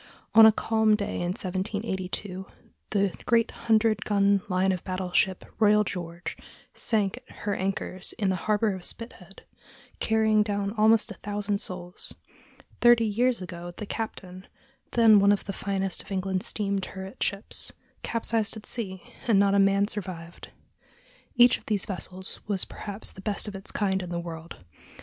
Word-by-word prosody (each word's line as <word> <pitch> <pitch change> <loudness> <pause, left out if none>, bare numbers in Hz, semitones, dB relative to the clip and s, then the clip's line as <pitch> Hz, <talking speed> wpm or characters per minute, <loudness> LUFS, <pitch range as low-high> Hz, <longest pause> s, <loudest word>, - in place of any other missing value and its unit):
On 220 0 +10
a - - +8
calm 220 0 +2
day 205 -1 -3
in 175 - -2
1782 190 -1 -3 0.4
the 200 -3 +1
great 230 -1 +3
hundred 220 -2 +2
gun 200 -1 +3
line 185 +1 +2
of 185 -2 -3
battle 185 -1 -4
ship 190 0 +1
Royal 210 -1 +5
George 175 -3 -5 0.4
sank 210 -2 0
at - - -14
her 205 - -1
anchors 190 -1 -3
in 200 -3 -1
the 190 - +1
harbor 210 0 +2
of 185 -1 -7
Spithead, 195 -5 -4 0.6
carrying 220 -1 +3
down 205 -1 -1
almost 220 0 +4
a 195 - -11
thousand 205 0 -2
souls; 180 -3 -4 0.6
thirty 240 -1 +6
years 230 0 +1
ago 175 -1 -7
the 210 - -5
Captain, 190 -4 -6 0.5
then 225 -3 +7
one 200 +1 +5
of 205 - 0
the 195 - -4
finest 195 -1 -2
of - - -15
England's 190 -1 -1
steam 200 -2 -1
turret 190 +1 -8
ships, 200 +1 -1 0.3
capsized 225 -1 0
at 215 - -10
sea, 190 -6 -3 0.2
and 225 -4 +4
not 200 0 +4
a 200 - +4
man 195 +1 +4
survived. 175 -5 -7 0.9
Each 245 0 +6
of - - -26
these 205 -3 +4
vessels 190 -2 -4
was 200 -3 +2
perhaps 205 +1 -3
the 190 - -12
best 205 +1 0
of 210 - -5
its 195 - -5
kind 190 -2 0
in 180 - -6
the 175 -1 -2
world. 165 - -8
200 Hz, 165 wpm, -27 LUFS, 185-215 Hz, 0.9 s, On